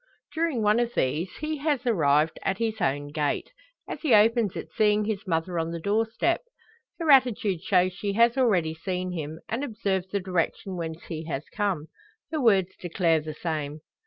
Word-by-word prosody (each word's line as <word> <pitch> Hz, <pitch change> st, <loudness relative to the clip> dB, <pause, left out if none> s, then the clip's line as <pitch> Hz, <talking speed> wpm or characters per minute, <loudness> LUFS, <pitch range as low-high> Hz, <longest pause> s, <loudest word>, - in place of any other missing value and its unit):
During 315 Hz, -8 st, 0 dB
one 210 Hz, +2 st, +4 dB
of 240 Hz, 0 st, -1 dB
these 155 Hz, +8 st, 0 dB
he 310 Hz, 0 st, -2 dB
has 285 Hz, -3 st, -1 dB
arrived 155 Hz, -, +2 dB
at 190 Hz, -, -1 dB
his 220 Hz, -2 st, -2 dB
own 145 Hz, -3 st, 0 dB
gate, 150 Hz, -1 st, -2 dB, 0.4 s
as -, -, -6 dB
he 275 Hz, -9 st, +4 dB
opens 220 Hz, -1 st, +4 dB
it -, -, -6 dB
seeing 210 Hz, -1 st, +2 dB
his 205 Hz, -2 st, -3 dB
mother 165 Hz, 0 st, -1 dB
on 165 Hz, 0 st, -1 dB
the 170 Hz, 0 st, -4 dB
door 210 Hz, +6 st, +1 dB
step. 335 Hz, +10 st, 0 dB, 0.6 s
Her 325 Hz, -3 st, +2 dB
attitude 225 Hz, -9 st, +4 dB
shows 185 Hz, -1 st, +2 dB
she 200 Hz, +2 st, -3 dB
has 235 Hz, +3 st, +4 dB
already 195 Hz, -12 st, +2 dB
seen 180 Hz, +2 st, -3 dB
him, 160 Hz, -2 st, -5 dB
and 235 Hz, +5 st, -2 dB
observed 195 Hz, -7 st, -2 dB
the 200 Hz, -, 0 dB
direction 185 Hz, +1 st, -2 dB
whence 165 Hz, -1 st, -5 dB
he 160 Hz, -2 st, -6 dB
has 150 Hz, -3 st, -3 dB
come. 195 Hz, -8 st, -1 dB, 0.5 s
Her 310 Hz, -2 st, -1 dB
words 195 Hz, -6 st, +3 dB
declare 170 Hz, -2 st, +1 dB
the 155 Hz, 0 st, -7 dB
same. 155 Hz, -2 st, -4 dB
190 Hz, 185 wpm, -26 LUFS, 165-225 Hz, 0.6 s, one